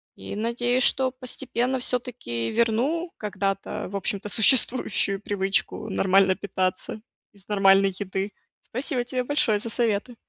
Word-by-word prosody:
И, - - -7
надеюсь, 240 +3 +1
что 260 -1 +3
постепенно 255 0 -2
всё-таки 240 - -2
верну 250 +10 0
когда-то, 195 -2 -3
в 200 - -7
общем-то, 200 +1 -3
существующую 220 -3 +3
привычку 205 +2 -2
нормально 190 -1 +3
питаться 185 +2 -3 0.3
из 200 -1 -19
нормальной 195 -1 +5
еды. 195 +1 -4 0.3
Спасибо 255 +1 -2
тебе 250 +1 -2
большое 245 -6 +1
за 230 +1 -5
советы. 230 +1 0
215 Hz, 125 wpm, -25 LUFS, 195-250 Hz, 0.3 s, нормальной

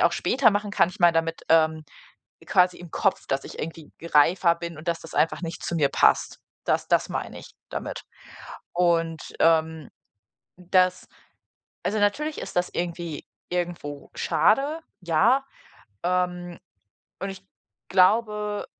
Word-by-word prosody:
auch - - +4
später 260 -4 +3
machen 205 0 -1
kann. 195 - +3
Ich 180 - -11
meine 175 -1 +6
damit, 165 0 -1
ähm, 160 -1 +3 0.6
quasi 180 0 +3
im 175 -2 -11
Kopf, 195 - 0
dass 135 0 -1
ich - - -10
irgendwie 160 -1 -7
reifer 170 +2 +3
bin 170 -1 -7
und 160 +3 -11
dass 170 -1 -1
das 165 - -12
einfach 165 - +1
nicht 165 -1 -6
zu - - -3
mir 150 -4 +3
passt. - - +2 0.3
Das - - 0
das - - +3
meine - - -5
ich - - -13 0.2
damit. - - -5 0.7
Und, 165 -2 +1 0.2
ähm, 160 -2 +2 0.7
das 185 0 +1 0.8
Also, 215 - 0
natürlich 295 +10 0
ist - - -8
das 180 - +1
irgendwie 170 -3 -4 0.3
irgendwo 170 -5 -4
schade, 275 - +2 0.2
ja, 195 - +3 0.6
ähm, 180 -1 -1 0.6
und 195 +2 -3
ich 195 0 -10 0.4
glaube 210 +2 +2
175 Hz, 140 wpm, -25 LUFS, 165-195 Hz, 0.8 s, meine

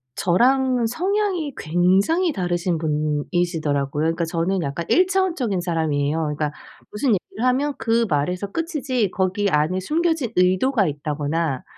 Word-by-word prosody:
저랑 250 +6 +2
성향이 365 - -1
굉장히 190 - +2
다르신 175 -1 -1
분이시더라고요. 150 -1 -1
그러니까 165 +1 0
저는 170 +3 -1
약간 145 +5 -4
1 365 +1 +4
차원적인 335 - 0
사람이에요. 160 -3 0
그러니까 150 -1 -2 0.4
무슨 245 +5 -1
얘기를 215 +5 -6
하면 275 +3 +1
그 230 +1 +2
말에서 180 +7 -1
끝이지, 270 - -1
거기 195 +2 0
안에 155 +4 +1
숨겨진 320 - 0
의도가 185 +4 +3
있다거나 150 0 -2
185 Hz, 340 characters per minute, -22 LUFS, 160-260 Hz, 0.4 s, 1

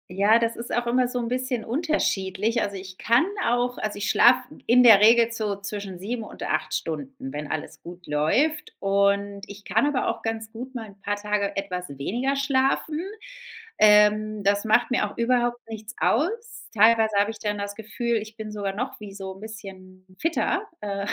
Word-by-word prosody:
Ja, 200 +5 +4
das 230 0 0
ist 235 - -6
auch 240 0 -1
immer 250 +1 +2
so 250 0 -3
'n 235 - -2
bisschen 250 -2 -2
unterschiedlich. 225 - 0
Also, 200 -1 -2
ich 185 -1 -9
kann 235 +5 +3 0.2
auch 245 +1 0
also, 215 -1 -3
ich 205 - -2
schlafe - - +5 0.2
in 250 +1 +5
der 225 -5 +9
Regel 230 +2 +5
so 215 -3 -2
zwischen 200 -2 -6
7 225 +5 -4
und - - -9
8 - - -1
Stunden, 270 -1 -3 0.2
wenn 150 0 -6
alles 155 - -5
gut 175 +1 -11
läuft. 280 - +1
Und 200 0 +1
ich 200 0 -11
kann 220 +7 +1
aber 290 -3 0
auch - - -2
ganz 225 -1 -4
gut 250 +3 -8
mal 225 -3 -5
'n 200 0 -18
paar 205 +1 -1
Tage 205 -1 -2
etwas 180 -2 -4
weniger 245 - -1
schlafen. 275 +2 +1 0.8
Ähm, 210 0 +4
das 200 +2 +2
macht 230 +3 +3
mir 210 -4 +1
auch - - -14
überhaupt 240 0 +1
nichts 220 +1 -8
aus. 445 - -1
Teilweise 220 0 +4
habe 205 +2 +3
ich 220 - -12
dann 210 -1 -2
das 200 0 -5
Gefühl, 230 +2 -2
ich 215 0 -7
bin 215 -1 -6
sogar 200 -2 -3
noch 250 +5 -4
wie 205 -2 -9
so 195 -1 -7
'n - - -14
bisschen 190 -3 -11
fitter, 340 +5 0
äh, 200 -1 -3
215 Hz, 190 wpm, -25 LUFS, 200-240 Hz, 0.8 s, der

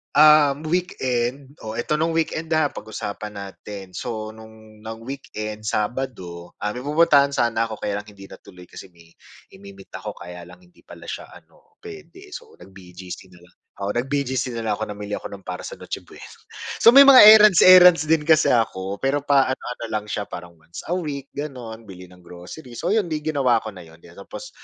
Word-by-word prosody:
ah, 150 -1 +6
weekend 135 -6 -2
oh, 110 0 -7
'eto 150 +6 -2
no'ng 165 +1 0
weekend 160 0 -2
ha, 155 -2 +1
pag-usapan 105 -1 -7
natin. 100 -1 -9
So, 110 -1 -5
no'ng 110 -1 -16
nang 110 +1 -9
weekend, 110 -5 -7
Sabado, 105 -7 -4
ah, 105 - -1
may 125 - -7
pupuntahan 140 -1 +3
sana 115 -2 0
ako 110 - -7
kaya 100 0 -3
lang 105 - -12
hindi 100 -1 -15
natuloy 90 -1 -14
kasi - - -12
may 85 -1 -21 0.4
imi-meet 100 0 -14
ako - - -7
kaya 90 0 -11
lang 180 - -16
hindi 180 -1 -25
pala - - -14
siya - - -7
ano, 455 -3 -20
puwede. 390 -2 -12
So, 470 -2 -11
nag-BGC 90 -1 -12
na 90 - -19
lang. 90 - -26 0.3
Oo, 100 - -1
nag-BGC 130 0 -2
na 115 - -5
lang 105 - +1
ako, - - -2
namili 105 0 -7
ako - - -5
ng 95 -1 -12
para 90 - -6
sa - - -8
Noche - - -7
Buena. - - -15 0.6
So, 230 - +9
may 275 +3 +8
mga 270 -2 +9
errands, 215 -5 +7
errands 180 -3 +8
din 155 -2 +2
kasi 160 -1 +4
ako, 100 -4 -1
pero 135 +2 -1
pa 140 -2 +3
ano-ano 125 -2 -5
lang 105 -1 -3
siya, 100 +1 -3
parang 85 -1 -10
once 80 +2 -11
a - - +1
week, 140 -5 -6
gano'n, 120 -6 -7
bili 90 -2 -12
ng 90 - -18
groceries. 90 - -11
So, 175 - -1
'yon 215 -4 +1
'di 155 -1 -3
ginawa 130 -6 +1
ko 110 - -6
na 90 -2 -11
'yon 80 +1 -18
tapos, 100 - -11
115 Hz, 190 wpm, -22 LUFS, 100-150 Hz, 0.6 s, So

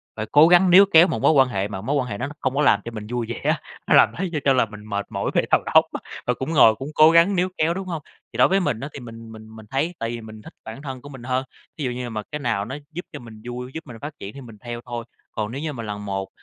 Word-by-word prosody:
phải 110 - -3
cố 150 +2 +7
gắng 180 +2 +6
níu 195 +3 +9
kéo 165 +2 +8
một - - -3
mối - - +5
quan 135 -4 +5
hệ 100 -4 -1
mà 100 -2 -6
mối 135 +8 -1
quan 130 -3 0
hệ 100 -4 -5
nó 125 - -3
không 130 0 -1
có 145 - +2
làm 135 -8 +4
cho 115 - -5
mình 105 -2 -7
vui 120 0 -2
vẻ 120 - -4
á, - - +1 0.3
nó - - +5
làm - - +7
thấy 185 +1 -2
cho 150 - 0
cho 135 - +5
là 125 -3 +3
mình 105 -1 -12
mệt 100 -1 -3
mỏi - - -2
về - - +4
đầu - - +5
óc - - +8
á, - - -3 0.3
và 125 - +3
cũng 130 +5 -4
ngồi, 115 -7 +6
cũng 135 +5 -7
cố 155 +1 +7
gắng 170 +4 +5
níu 180 +1 +1
kéo, 160 +2 +2
đúng 190 +1 -6
hông? 165 -4 -4 0.3
Thì - - -7
đối 125 - +6
với 195 +1 +2
mình 125 - -1
á 140 - -5
thì - - -7
mình 115 -2 -10
mình 110 0 -12
mình 110 -1 -12
thấy 155 +6 -1
tại 115 - -2
vì 120 0 -5
mình 110 -1 -11
thích - - -13
bản 110 +4 -8
thân 135 -3 -7
của 145 - -11
mình 130 -4 -11
hơn, 130 +1 -1 0.3
thí 155 - -4
dụ 125 - -1
như 125 0 -5
mà 110 -2 -4
cái 150 - -3
nào 115 -7 -1
nó 130 +5 -6 0.2
giúp 175 +3 -6
cho - - -6
mình 110 -3 -12
vui, 125 +1 -6
giúp 160 -1 -7
mình 120 -3 -9
phát 145 +1 -6
triển 100 - -7
thì 140 - -10
mình 115 -4 -12
theo 120 +1 -7
thôi. 120 -2 -5 0.3
Còn 105 0 -3
nếu 135 +4 -5
như 155 -1 -3
mà 115 -3 -6
lần 105 -1 -6
một, 95 -1 -3
125 Hz, 325 wpm, -23 LUFS, 110-150 Hz, 0.3 s, níu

